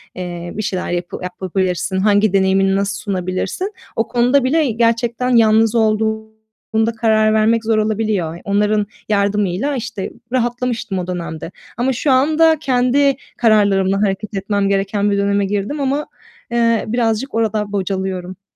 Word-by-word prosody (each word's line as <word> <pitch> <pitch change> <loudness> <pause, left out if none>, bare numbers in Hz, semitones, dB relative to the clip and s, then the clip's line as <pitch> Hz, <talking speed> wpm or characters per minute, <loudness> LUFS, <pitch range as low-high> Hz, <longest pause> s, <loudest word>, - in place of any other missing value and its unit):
eee, 175 -1 -6
bir 215 - -2
şeyler 185 -2 -3
yapı 175 0 -3
yapabilirsin, 185 0 -2
hangi 205 0 +3
deneyimini 195 0 +3
nasıl 200 0 -1
sunabilirsin, 190 - -3 0.2
o 225 - 0
konuda 250 +3 +2
bile 285 -1 +2
gerçekten 235 +2 0
yalnız 225 +1 +4
olduğunda 220 0 -1
karar 215 -1 +3
vermek 220 +1 +2
zor 220 -1 +2
olabiliyor. 215 -6 -1
Onların 205 +1 +1 0.2
yardımıyla, 205 +5 0
işte, 225 -5 -5 0.2
rahatlamıştım 240 -5 -1
o 180 - -4
dönemde 170 -2 -5 0.3
ama 260 +2 +1
şu 270 +3 0
anda 310 +4 +4
kendi 265 0 +2 0.2
kararlarımla 200 -3 +3
hareket 205 +1 -1
etmem 200 0 0
gereken 200 +1 0
bir 200 - +1
döneme 200 0 +1
girdim 205 +9 -2
ama, 280 +2 -1 0.4
eee, 230 -1 +2
birazcık 235 +2 -1
orada 215 -2 0
bocalıyorum. 190 -1 -4
215 Hz, 135 wpm, -18 LUFS, 195-235 Hz, 0.4 s, yalnız